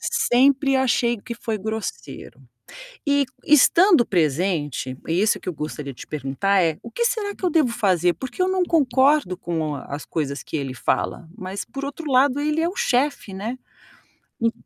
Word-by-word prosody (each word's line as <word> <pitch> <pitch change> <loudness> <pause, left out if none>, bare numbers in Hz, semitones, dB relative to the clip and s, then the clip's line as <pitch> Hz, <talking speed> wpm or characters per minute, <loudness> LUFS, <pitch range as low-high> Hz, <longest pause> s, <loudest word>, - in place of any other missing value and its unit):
Sempre 270 +2 +3
achei 240 -2 +2
que 235 - -7
foi 225 -2 -4
grosseiro. 220 +2 -6 0.7
E, 285 0 +3 0.2
estando 320 - +5
presente, 155 - 0
isso 185 +6 +2
que - - -5
eu 180 - -4
gostaria 150 -2 -6
de - - -13
te - - -10
perguntar 155 +8 0
é, 160 -3 +1
o 235 - -9
que 475 - -1
será 440 -4 -1
que - - -19
eu 365 - +3
devo 305 -6 +3
fazer? 185 -7 +2
Porque 255 - -8
eu 365 - +3
não 375 -1 +1
concordo 275 - +3
com 165 -4 -3
as 140 +1 -7
coisas 140 -3 -3
que - - -6
ele 135 -4 -3
fala, 160 +6 -2
mas 190 -1 -6
por 275 - -7
outro 285 +2 -5
lado, 265 +2 +4
ele 300 +2 0
é 335 - +1
o 370 - -9
chefe, 260 -5 0
né. 215 +6 -4 0.8
En 230 0 +3
230 Hz, 175 wpm, -22 LUFS, 170-285 Hz, 0.8 s, estando